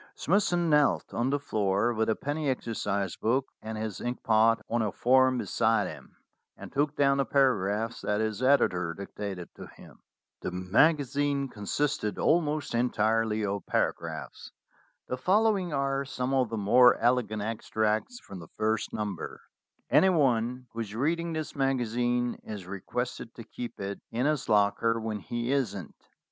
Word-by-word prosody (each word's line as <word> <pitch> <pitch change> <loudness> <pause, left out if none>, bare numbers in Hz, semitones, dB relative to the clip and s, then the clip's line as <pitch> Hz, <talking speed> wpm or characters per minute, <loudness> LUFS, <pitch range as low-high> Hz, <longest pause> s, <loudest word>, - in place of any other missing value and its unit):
Smithson 175 -2 +1
knelt 150 -2 +2
on 120 +3 0
the 145 - +1
floor 105 -3 0
with 110 0 0
a 110 - +2
penny 145 +1 -2
exercise 100 -7 -2
book 130 +4 0 0.2
and 110 0 -6
his 110 -3 -4
inkpot 115 -2 +2
on 120 0 0
a 105 -2 0
form 130 +1 +3
be - - -3
side 115 0 +2
him, - - -11 0.4
and - - -10
took 145 +1 0
down 140 -1 +3
the 140 - +2
paragraphs 115 -4 +1
that 105 0 -1
his 110 +1 -2
editor 90 -11 +2
dictated 100 -2 -7
to - - -10
him. - - -16 0.4
The - - -3
magazine 140 - +1
consisted 105 +1 -2
almost 155 -3 +1
en 120 +1 +2
tirely 110 0 +1
of 100 0 -3
paragraphs. - - -3 0.6
The 125 - -3
following 195 - +2
are 140 -1 0
some 130 -1 -3
of 130 -3 +2
the 115 - -3
more 120 +5 +6
elegant 115 -3 +1
extracts 110 - -1
from 95 - -10
the 80 - -11
first 110 0 -1
number: 105 -5 -4 0.5
"Anyone 130 -8 +3
who 115 - -6
is 110 -2 -4
reading 165 +6 0
this 155 -1 -4
magazine 120 -2 0
is 105 -4 -7
requested 115 +5 -5
to 115 - -9
keep 120 +2 -8
it 100 0 -5
in 120 +3 -1
his 150 -4 0
locker 105 +2 +2
when 110 -1 -3
he 120 +4 -3
isn't. 100 - -2
120 Hz, 155 wpm, -28 LUFS, 105-140 Hz, 0.6 s, more